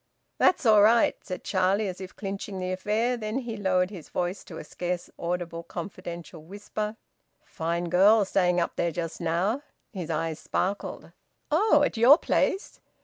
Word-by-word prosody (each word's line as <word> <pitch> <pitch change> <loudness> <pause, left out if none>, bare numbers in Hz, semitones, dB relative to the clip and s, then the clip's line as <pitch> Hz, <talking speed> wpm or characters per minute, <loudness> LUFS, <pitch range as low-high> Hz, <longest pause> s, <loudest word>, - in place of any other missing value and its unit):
"That's 320 - +3
all 215 -2 +7
right," 225 +3 +5
said 185 - -6
Charlie, 195 +2 +1
as 185 0 -6
if 190 - -9
clinching 195 -1 -5
the 185 0 -3
affair. 215 +6 0
Then 215 +1 -3
he 240 -4 -4
lowered 185 -2 +1
his 180 -7 -10
voice 180 +2 -2
to 165 - -9
a - - -7
scarce 175 +3 -4
audible 170 -1 -3
confidential 175 0 -8
whisper. 205 +5 -5 0.5
"Fine 170 +1 -3
girl 200 +4 +5
staying 180 -2 +2
up 170 - -2
there 170 - +1
just 165 +2 -5
now!" 180 +10 0 0.3
His 180 -5 -5
eyes 160 0 -2
sparkled. 195 +2 -3 0.4
"Oh! 310 -2 +4
At 285 - 0
your 250 +7 +8
place?" 390 +2 0
190 Hz, 160 wpm, -27 LUFS, 175-215 Hz, 0.5 s, your